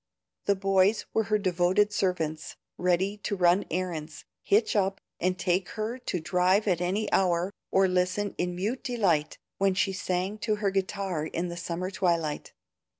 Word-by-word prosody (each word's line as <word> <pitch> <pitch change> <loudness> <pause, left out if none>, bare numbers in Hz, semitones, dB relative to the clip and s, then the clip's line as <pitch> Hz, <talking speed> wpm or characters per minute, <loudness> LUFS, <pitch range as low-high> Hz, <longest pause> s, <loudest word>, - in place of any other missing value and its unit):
The 200 - +3
boys 195 +2 +2
were 220 - +2
her 215 0 +2
devoted 190 +2 +2
servants, 165 -6 -1 0.2
ready 180 +3 +1
to 205 0 -3
run 180 +1 +3
errands, 170 -3 -4 0.2
"hitch 215 +3 +2
up" 195 -1 +1 0.2
and 185 +1 0
take 180 +1 0
her 220 +4 -3
to 185 -7 -3
drive 180 +5 +2
at 180 -3 +2
any 195 +4 0
hour, 180 0 +2 0.2
or 190 0 +4
listen 185 +2 0
in 180 0 -1
mute 210 +8 -2
delight 190 - +1 0.2
when 195 -1 +2
she 195 0 +1
sang 185 +2 -2
to 215 0 0
her 205 -2 0
guitar 190 -4 -2
in 175 +2 -3
the 170 - -5
summer 175 +2 -4
twilight. 170 -5 -1
185 Hz, 160 wpm, -28 LUFS, 175-200 Hz, 0.2 s, or